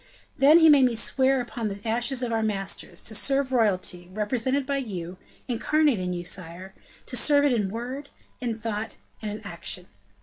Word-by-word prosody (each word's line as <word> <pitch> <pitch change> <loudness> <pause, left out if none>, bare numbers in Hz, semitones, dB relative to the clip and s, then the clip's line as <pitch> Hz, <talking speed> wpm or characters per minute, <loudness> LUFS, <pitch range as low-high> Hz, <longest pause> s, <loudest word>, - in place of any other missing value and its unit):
Then 290 +4 +7
he 325 -1 +7
made 285 -4 +7
me 245 -2 +1
swear 265 +4 +2
upon 235 -2 -4
the 200 -1 -5
ashes 240 +3 0
of 240 - -1
our 225 - +1
masters, 200 -3 -3
to 225 - -6
serve 270 +4 0
royalty, 185 -7 0
represented 245 +7 0
by 280 0 -1
you 185 -8 -5 0.3
incarnate 280 +1 +2
in 180 0 -2
you, 175 -1 -3
sire 180 +1 -4 0.3
to 250 - -4
serve 285 +2 +3
it 280 - +3
in 210 -5 0
word, 250 +6 -5 0.3
in 235 -3 -2
thought, 220 -1 -4 0.3
and 215 - -3
in 210 +1 -6
action. 180 -2 -5
230 Hz, 180 wpm, -26 LUFS, 195-265 Hz, 0.3 s, Then